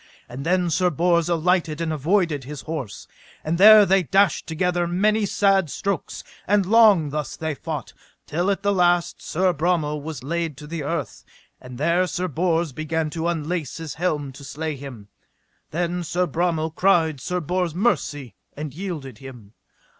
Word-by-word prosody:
And 125 +3 -7
then 180 +1 +1
Sir 180 +3 +2
Bors 170 +1 +1
alighted 170 -2 +1
and 165 -1 -1
avoided 155 -1 +1
his 140 +1 -7
horse, 150 -9 -6 0.4
and 165 +3 -1
there 215 +1 +9
they 195 0 +3
dashed 190 +1 +2
together 175 +1 0
many 205 +4 +1
sad 195 -4 +2
strokes; 195 +6 -3 0.2
and 205 -1 +3
long 205 -8 +5
thus 150 -1 -4
they 160 -1 -2
fought, 150 -3 -6 0.3
till 175 +5 -1
at 200 0 -1
the 200 0 +2
last 175 -2 +2
Sir 185 +2 0
Bromel 155 -2 0
was 155 -2 -7
laid 165 0 -3
to 150 - -10
the 160 +1 -5
earth, 145 -3 -4 0.4
and 125 -1 -10
there 170 +6 +2
Sir 180 +1 -2
Bors 170 0 0
began 155 +1 -2
to 165 +1 -2
unlace 165 -2 -3
his 160 -3 -6
helm 150 -5 -2
to 135 +2 -13
slay 150 +3 -4
him. 125 -7 -10 0.6
Then 175 +2 -2
Sir 180 +2 0
Bromel 165 -1 -1
cried 165 -8 +2
Sir 180 0 -2
Bors 175 0 -2
mercy, 145 - -1 0.2
and 150 -2 -5
yielded 150 - -6
him. 120 -6 -12
165 Hz, 165 wpm, -23 LUFS, 150-180 Hz, 0.6 s, there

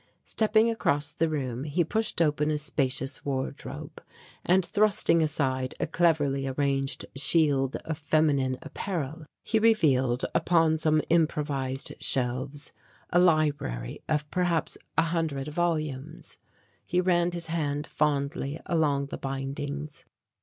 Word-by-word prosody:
Stepping 220 +1 +2
across 150 -10 0
the 165 +1 0
room 130 -5 -3
he 155 +4 +1
pushed 215 0 0
open 150 -1 +1
a 155 - +1
spacious 135 -2 -2
wardrobe, 135 -2 -5 0.4
and 185 0 +3
thrusting 200 -5 +3
aside 130 -4 -1
a - - +1
cleverly 150 -5 +1
arranged 135 0 -1
shield 140 -2 +2
of 160 -1 -4
feminine 145 -4 +2
apparel 160 -3 -5 0.2
he 220 - +1
revealed, 135 - +3
upon 165 -2 +3
some 155 -1 +2
improvised 145 -5 0
shelves, 130 +3 +1 0.4
a 175 - +4
library 150 - +1
of 150 -1 0
perhaps 175 -3 0 0.2
a 165 - +5
hundred 160 -5 -2
volumes. 155 -3 -3 0.5
He 175 - 0
ran 175 -1 +2
his 170 -1 -4
hand 150 -3 -2
fondly 145 0 -1
along 150 -4 +1
the - - -6
bindings. 140 +2 -5
150 Hz, 120 wpm, -27 LUFS, 135-165 Hz, 0.5 s, a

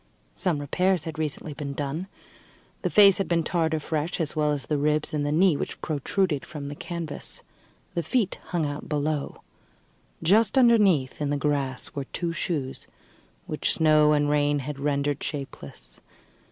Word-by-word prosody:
Some 180 -5 0
repairs 180 +4 +1
had 160 -1 -6
recently 155 0 -3
been 140 -1 -5
done; 145 +6 -3 0.7
the - - 0
face 200 -2 +6
had 195 - 0
been 170 -1 +1
tarred 160 -1 0
afresh, 155 +2 -2
as 155 -3 -1
well 150 -1 +2
as 140 -4 -2
the 150 +1 0
ribs 150 +1 +1
and 150 -1 0
the 145 - 0
knee 170 +1 +4
which - - -4
protruded 155 0 -1
from 145 -3 -7
the 145 - -6
canvas. 165 -1 -5 0.5
The 170 - 0
feet 200 - 0
hung 170 -4 -1
out 145 0 -5
below. 150 -1 -2 0.8
Just 210 +7 +4
underneath, 205 - +4
in 145 - 0
the 145 - 0
grass, 140 -3 -2
were 140 -1 -4
two 170 +4 -3
shoes, 150 -6 -3 0.6
which - - -1
snow 155 -1 +5
and 145 -1 +2
rain 145 0 +2
had 150 -2 -5
rendered 145 0 0
shapeless. 140 -3 -7
150 Hz, 165 wpm, -26 LUFS, 145-170 Hz, 0.8 s, face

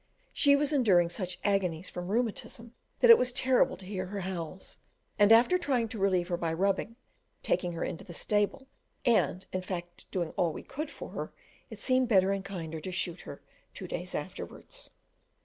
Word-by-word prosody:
She 285 -1 +5
was 295 +1 +1
enduring 185 -11 +4
such 185 0 -3
agonies 185 -4 0
from 175 0 -6
rheumatism 230 +1 -2 0.3
that 485 - +9
it 460 - +9
was 250 - +1
terrible 255 +1 +2
to 190 - -11
hear 185 -1 -4
her 200 +1 -4
howls; 185 -1 -6 0.4
and 205 +1 +6
after 245 +11 +6
trying 255 -8 0
to 220 - -6
relieve 185 -2 +1
her 175 - 0
by 165 -1 -1
rubbing, 195 +5 0 0.5
taking 175 -1 0
her 165 - -3
into - - -4
the - - -11
stable 205 +8 0 0.4
and 215 -6 +2
in 185 - -1
fact 175 -1 -7
doing 175 -4 -2
all 170 -3 0
we - - -8
could 300 +3 -5
for - - -9
her - - -5 0.4
it - - -9
seemed 255 -1 +2
better 195 -4 +4
and 195 -1 -2
kinder 165 -5 -6
to 185 - -5
shoot 175 0 -3
her - - -10 0.3
two - - -6
days - - -5
afterwards. - - -7
195 Hz, 185 wpm, -30 LUFS, 175-240 Hz, 0.5 s, that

